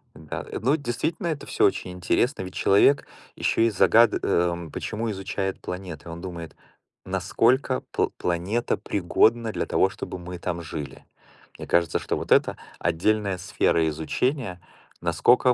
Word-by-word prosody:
Да. 80 -1 -6 0.2
Ну, 140 +7 +3
действительно, 150 - -2
это 145 -3 -3
всё - - +2
очень 90 - 0
интересно, 90 +6 0
ведь 95 - -8
человек 135 +8 +4 0.3
ещё - - +1
и 115 - +4
загад 115 +3 +5
э, 85 -1 0
почему 110 +1 -3
изучает 95 0 -3
планеты. 90 -3 -7
Он 85 +1 -7
думает: 85 -3 -7 0.5
"Насколько 130 +2 +1
пл - - +1
планета 90 +7 -1
пригодна 110 +4 +2
для - - -2
того, 95 - +2
чтобы 95 -1 -6
мы 90 0 -8
там 85 -1 -3
жили?" 75 -2 -7 0.5
Мне - - -8
кажется, 85 -2 +2
что - - -2
вот - - -6
это- - - +4 0.2
отдельная 100 +2 +1
сфера 85 -2 +1
изучения, 90 - -2 0.4
насколько 120 +9 +4
95 Hz, 145 wpm, -25 LUFS, 85-115 Hz, 0.5 s, загад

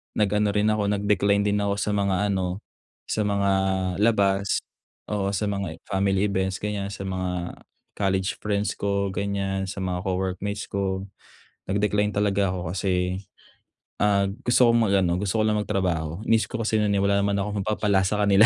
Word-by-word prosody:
nag-ano 105 0 +1
rin 105 +1 +3
ako, 105 -1 0
nag-decline 100 0 +2
din 105 0 +1
ako 100 0 0
sa 105 +1 -1
mga 100 0 +1
ano, 95 +1 -2 0.5
sa 105 -1 +1
mga 100 -1 +1 0.5
labas. 100 -3 +2 0.5
Oo, 100 -1 0
sa 105 +2 -1
mga 100 -5 -3
family 95 0 +1
events 95 0 -1
ganiyan, 105 -2 -2
sa 100 -1 -6
mga 90 -2 -3 0.4
college 95 -1 0
friends 105 0 0
ko 100 -1 0
ganiyan, 95 -1 -2
sa 95 0 -4
mga 90 -1 -1
co-workmates 95 +2 -2
ko. 95 -1 -1 0.6
Nag-decline 105 +1 +1
talaga 100 -1 +2
ako 90 -3 -4
kasi, 90 -1 0 0.8
ah, 100 -1 +3 0.2
gusto 120 0 +5
kong 115 -1 +3
mag-ano, 90 -3 +2
gusto 100 +2 -1
ko - - +3
lang 105 0 +2
magtrabaho. 90 -5 -1
Inisip 115 0 +2
ko - - -1
kasi 110 0 +1
nun, 105 -1 +2
eh, 100 - +2
wala 100 0 +3
naman 100 0 +1
akong 100 0 -2
mapapala 105 -2 +2
sa 105 +2 0
kanila, 100 +2 +6
100 Hz, 165 wpm, -25 LUFS, 95-105 Hz, 0.8 s, kanila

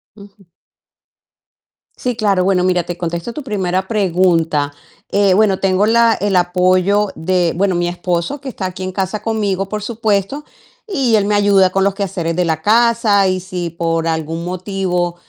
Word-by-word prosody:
Ujú. 200 -2 -16 1.5
Sí, 250 -1 -2
claro. 200 -4 +1
Bueno, 185 -1 +2
mira, 180 -1 +1
te 175 +1 -6
contesto 170 +6 -4
tu 300 - -6
primera 190 -5 -2
pregunta. 170 -8 +1 0.4
Eh, 200 -2 +3
bueno, 195 -1 +3
tengo 195 +1 +2
la 230 0 +4
el 205 -2 -1
apoyo 185 +3 +2
de 175 0 0
bueno, 190 +1 +1
mi 175 0 0
esposo, 175 +9 -2
que 270 - -6
está 195 - -5
aquí 185 0 -5
en 185 - -3
casa 190 +2 -3
conmigo, 205 -3 -1
por 210 0 -4
supuesto, 220 +4 -1 0.4
y 270 - +1
él 205 -2 +2
me 205 0 +1
ayuda 200 -2 +4
con 195 +1 +1
los 200 - +1
quehaceres 180 -5 -3
de 180 - +1
la 160 -1 -1
casa, 225 -1 +3
y 185 0 -1
si 180 -2 -5
por 165 0 -2
algún 160 +1 -3
motivo 180 -1 -2
190 Hz, 170 wpm, -17 LUFS, 175-210 Hz, 1.5 s, la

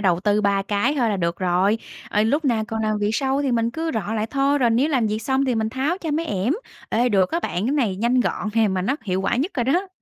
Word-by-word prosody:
đầu 180 -4 +2
tư 205 +1 +2
3 200 -1 +1
cái 210 +9 0
thôi 235 -2 +2
là 205 - 0
được 170 -1 -2
rồi. 185 +4 +2 0.3
Ờ, 210 - +2
lúc 285 +8 +1
nào 230 -5 +1
còn 220 -1 -2
làm 215 -1 0
việc 205 0 0
sau 270 +2 0
thì 265 -3 0
mình 230 0 +1
cứ 325 +4 -3
rọ 220 0 -2
lại 215 0 -1
thôi, 280 +1 +2
rồi 240 -4 +3
nếu 255 +7 +2
làm 255 -7 +1
việc 215 +1 -1
xong 265 +3 +1
thì 255 -2 0
mình 220 -1 0
tháo 275 +10 -1
cho 325 -4 -4
mấy 320 +3 -1
ẻm. 205 +2 0 0.4
Ê, 240 +3 +2
được 195 -5 +2
á 335 - 0
bạn, 200 - -2
cái 270 - 0
này 230 -11 0
nhanh 240 +4 +2
gọn 215 - -1
nè, 225 -2 +3
mà 190 -1 -1
nó 260 +9 0
hiệu 190 -2 -1
quả 195 - 0
nhất 290 +9 0
rồi 245 - 0
đó. 355 +10 +1
225 Hz, 290 wpm, -22 LUFS, 205-270 Hz, 0.4 s, rồi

